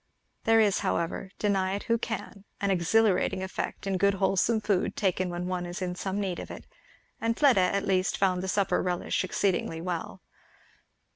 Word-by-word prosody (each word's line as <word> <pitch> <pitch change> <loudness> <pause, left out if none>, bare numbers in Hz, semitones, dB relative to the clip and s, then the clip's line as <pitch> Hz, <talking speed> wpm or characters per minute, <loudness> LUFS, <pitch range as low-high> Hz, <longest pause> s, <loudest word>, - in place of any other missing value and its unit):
There 225 0 +5
is 210 -3 +3
however, 170 +3 -2
deny 195 -2 +1
it 200 - -5
who 230 0 +1
can, 220 -3 -5 0.2
an 200 -1 +1
exhilarating 190 +1 +2
effect 190 +1 -4
in 190 -1 -1
good 200 +1 +3
wholesome 195 +3 +2
food 205 -4 0
taken 185 -2 0
when 175 0 -4
one 180 -1 -2
is 175 +3 -6
in 180 -1 -2
some 190 +2 -3
need 190 -3 -2
of - - -7
it; - - -9 0.6
and 230 0 0
Fleda 270 -10 +5
at 195 +2 +1
least 190 -1 +1
found 185 -2 +2
the 190 - -4
supper 195 0 +1
relish 180 0 -1
exceeding 185 0 0 0.2
well. 175 -3 -4
190 Hz, 180 wpm, -28 LUFS, 180-205 Hz, 0.6 s, There